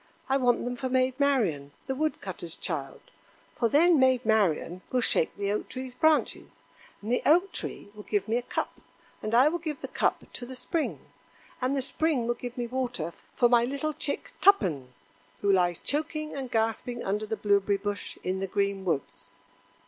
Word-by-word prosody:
I 265 - +3
want 245 -3 +2
them 245 0 -2
for 260 +1 -3
Maid 255 +1 +1
Marian, 195 - +1
the 265 - -2
wood 310 +3 -1
cutter's - - -4
child; - - -4 0.5
for 235 - +1
then 325 +4 +5
Maid 260 -2 +4
Marian 185 -5 +2
will 255 - +2
shake 200 - +1
the 200 0 -1
Oak 210 - -2
tree's 255 -1 -6
branches, 315 +3 +2 0.6
and 215 - -3
the 245 - +2
Oak 355 +6 +4
tree - - -5
will 210 - -10
give 205 -1 -1
me 225 +2 +1
a - - 0
cup, 245 - -3 0.5
and 215 +2 -1
I 255 +4 +7
will 345 +3 0
give 310 -3 -5
the - - -4
cup - - 0
to - - -7
the 260 - -7
Spring, 320 +4 -2 0.6
and 260 +2 +1
the 265 - 0
Spring 290 -2 0
will 240 - +1
give 245 +1 -7
me 240 - -1
water 240 -9 -3 0.2
for 245 - +5
my 240 -1 +5
little 280 +5 -2
chick 285 - -3
Tuppen, 180 - +4 0.5
who 200 - +3
lies 175 -3 +3
choking 305 +1 -2
and 265 -2 -4
gasping 225 +2 -1
under 210 +2 -1
the 220 0 -2
blueberry 200 -1 +2
bush 205 0 -4
in 185 +1 -1
the 195 - -2
green 200 0 -1
woods." 140 - -3
240 Hz, 190 wpm, -28 LUFS, 200-270 Hz, 0.6 s, I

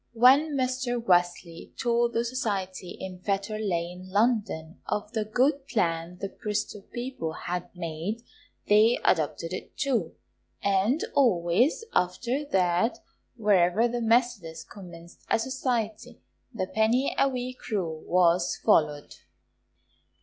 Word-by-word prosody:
When 270 +6 +5
Mr. 255 -1 -1
Wesley 175 -5 0
told 235 0 +1
the 230 +1 0
society 195 -7 -3
in 185 -1 -7
Fetter 200 +3 -2
Lane, 180 -2 -3
London, 205 -6 0
of 210 0 -2
the 220 -2 0
good 270 +5 +1
plan 170 -7 -1
the 195 - -3
Bristol 210 0 -4
people 240 -10 -4
had 180 +1 -4
made, 175 +6 -4 0.4
they 215 +3 +5
adopted 165 +1 +1
it 185 - -7
too, 240 - 0 0.5
and 200 +9 +2
always 235 - +2
after 235 +10 0
that 185 -2 +1 0.4
wherever 205 0 +3
the 240 0 -3
Methodists 225 -8 +1
commenced 170 -3 -12
a - - +4
society, 230 -3 -3 0.3
the 220 -7 -2
penny 220 +7 +1
a 275 - +4
week 255 -1 -6
rule 170 -8 -2
was 175 0 +2
followed. 150 -8 +1
210 Hz, 120 wpm, -27 LUFS, 175-240 Hz, 0.5 s, When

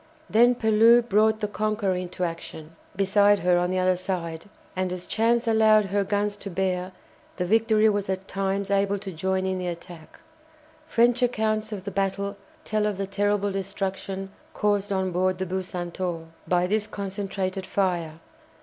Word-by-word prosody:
Then 240 +3 +5
Pellew 225 +1 +5
brought 220 0 +2
the 210 - 0
"Conqueror" 210 -1 -1
into 180 0 -4
action 165 -2 -6 0.2
beside 200 +1 +4
her 175 0 +3
on 180 0 0
the 185 - -1
other 185 0 +3
side, 175 -3 -4 0.3
and 185 -1 -1
as 180 -1 -5
chance 230 +2 +1
allowed 220 -1 +5
her 200 +1 0
guns 205 +1 -1
to 200 - -7
bear 185 0 -1 0.5
the 180 - -1
"Victory" 220 +2 +3
was 205 -2 0
at 190 0 -3
times 195 0 -2
able 200 0 +2
to 195 -1 -7
join 190 +3 -1
in 190 0 -1
the 180 - -3
attack. 170 -1 -9 0.7
French 240 -2 +3
accounts 220 -3 0
of 200 -3 -5
the 200 - -5
battle 200 +1 -1 0.3
tell 215 -1 0
of 205 -2 -2
the 195 - -2
terrible 205 +1 0
destruction 195 0 -4 0.2
caused 205 -1 0
on 190 -1 0
board 185 +1 +1
the 190 - -2
"Bucentaure" 180 -2 -4 0.2
by 180 0 +2
this 210 +3 0
concentrated 195 -1 -4
fire. 175 -5 -1
195 Hz, 165 wpm, -25 LUFS, 185-210 Hz, 0.7 s, Then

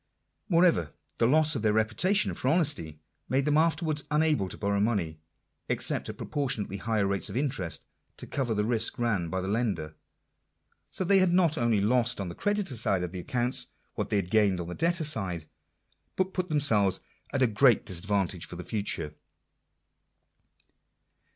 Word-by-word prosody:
Moreover, 170 - +3 0.3
the 115 - +4
loss 155 +3 +3
of 120 - -2
their 105 -1 +2
reputation 115 - +1
for - - -4
honesty 145 - +1 0.3
made 135 +1 +1
them 150 -1 +2
afterwards 155 -1 +1
unable 150 -9 +2
to - - -8
borrow 100 -1 0
money, 100 -8 0 0.5
except - - 0
at - - -7
proportionately 125 -9 -2
high 110 +1 -1
rates 100 -1 -1
of - - -4
interest, 130 - -2 0.3
to - - -8
cover 125 -5 -2
the 105 - +1
risk 115 0 +1
ran 105 -8 0
by 95 +1 -2
the 95 - -4
lender/' 100 -8 -1 1.0
So - - -3
that 195 +2 +2
they 190 -1 +6
not 175 -3 +3
only 115 -6 +2
lost 120 +3 +2
on 95 -3 -3
the - - -6
creditor 205 - -1
side 100 -5 +1
of 90 - -4
their 90 -1 -5
accounts 125 +2 -1 0.3
what - - -3
they 105 - +2
gained 100 0 +2
on 85 - -3
the - - -4
debtor 170 - +1
side, 95 - 0 0.7
but 185 0 -1
put 185 -1 -2
themselves 110 - +2 0.3
at 135 -2 +1
a - - +7
great 120 +1 +4
disadvantage 95 -1 -1
for - - -9
the 90 - -7
future. 90 -8 -2
115 Hz, 170 wpm, -28 LUFS, 95-150 Hz, 1.0 s, a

